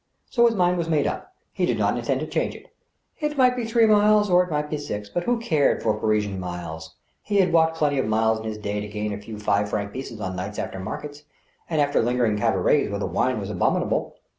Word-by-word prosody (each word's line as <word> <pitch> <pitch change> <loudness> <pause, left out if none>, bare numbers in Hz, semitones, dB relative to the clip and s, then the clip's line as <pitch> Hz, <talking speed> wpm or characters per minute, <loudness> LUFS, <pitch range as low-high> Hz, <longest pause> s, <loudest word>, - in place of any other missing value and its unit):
So 235 -1 +5
his 230 - 0
mind 180 -2 +2
was 165 -1 -2
made 150 -3 +2
up. - - -4 0.2
He - - 0
did - - 0
not - - +1
intend - - -1
to - - -2
change - - -2
it. - - -15 0.5
It 300 -2 -2
might 250 -1 +4
be 245 -2 -2
three 230 0 +3
miles 210 -1 +4
or 180 0 +6
it 180 - -8
might 150 -1 -1
be 150 0 -3
six, 105 -8 -5
but 175 +10 -3
who 245 0 +2
cared 160 -11 +1
for 110 - +2
Parisian 105 -3 0
miles? 85 -3 -6 0.3
He 205 - -1
had 185 -3 +3
walked 160 -1 +3
plenty 145 -3 +1
of 130 - 0
miles 110 +1 +2
in 110 - -8
his 110 -1 -4
day 105 -1 -3
to 105 - -5
gain 105 0 -3
a 100 - -6
few 105 +1 -8
five 105 0 0
franc 100 -1 -3
pieces 130 -4 -7
on 95 -2 -4
nights 100 +3 -5
after 95 - -4
maricets, 145 +10 -6 0.5
and 160 -2 0
after 145 0 +2
lingering 120 -1 +1
in 105 - -1
cabarets - - +2
where - - -2
the - - -2
wine - - 0
was - - -5
abominable. - - 0
130 Hz, 245 wpm, -24 LUFS, -, 0.5 s, or